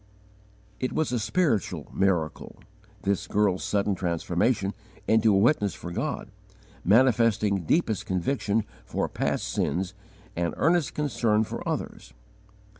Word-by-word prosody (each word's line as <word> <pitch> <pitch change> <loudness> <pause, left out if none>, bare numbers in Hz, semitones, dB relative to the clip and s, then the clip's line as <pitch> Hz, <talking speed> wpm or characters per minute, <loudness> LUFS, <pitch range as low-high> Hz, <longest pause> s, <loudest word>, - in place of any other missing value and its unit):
It 130 - -2
was 155 -4 0
a 125 - 0
spiritual 105 - 0
miracle 90 -5 -1 0.4
this 100 0 0
girl's 100 -3 +1
sudden 100 0 +1
transformation 90 +4 0 0.3
into 110 0 +4
a 100 - +4
witness 105 -1 +3
for 85 - -7
God, 115 - -3 0.5
manifesting 110 -4 +3
deepest 110 - +1
conviction 100 +3 0 0.2
for - - -2
past - - -2
sin 90 +9 0 0.5
and 85 0 -1
earnest 165 0 +2
concern 115 -7 +1
for - - -5
others. - - -5
105 Hz, 115 wpm, -27 LUFS, 95-120 Hz, 0.5 s, into